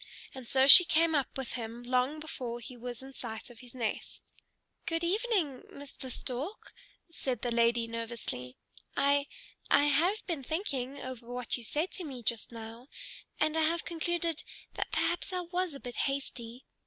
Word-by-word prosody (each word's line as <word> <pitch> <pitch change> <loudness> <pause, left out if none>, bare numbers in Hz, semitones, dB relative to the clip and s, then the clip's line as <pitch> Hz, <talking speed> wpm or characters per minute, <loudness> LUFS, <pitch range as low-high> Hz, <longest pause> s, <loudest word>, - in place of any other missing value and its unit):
And 260 -3 -9
so 265 +2 +4
she 360 +6 +13
came 330 -1 +3
up 280 -3 0
with 265 -2 -4
him 235 0 -5
long 255 +4 +1
before 250 -6 -5
he 245 +2 -8
was 245 +1 -7
in 270 0 -10
sight 230 -1 -6
of 235 - -14
his 250 0 -13
nest. 230 -4 -3 0.6
"Good 330 0 0
evening, 370 - +1
Mr. 280 -2 -6
Stork," 265 - -5 0.4
said 255 -8 -3
the 240 - 0
lady 235 0 +3
nervously. 230 - -4 0.4
"I 280 0 +3 0.4
I 285 - +6
have 330 +9 +2
been 330 -6 -2
thinking 280 -4 -2
over 245 -2 -7
what 250 -1 -2
you 240 - -6
said 305 +10 -1
to 370 - -4
me 260 -6 -7
just 230 0 0
now, 230 +2 -9 0.5
and 310 +1 +2
I 320 - +3
have 330 +2 +1
concluded 335 -1 -1 0.3
that - - -3
perhaps 350 +2 0
I 365 -1 -1
was 355 -2 -2
a - - -7
bit 245 -2 -7
hasty. 255 -3 -3
265 Hz, 170 wpm, -31 LUFS, 240-320 Hz, 0.6 s, she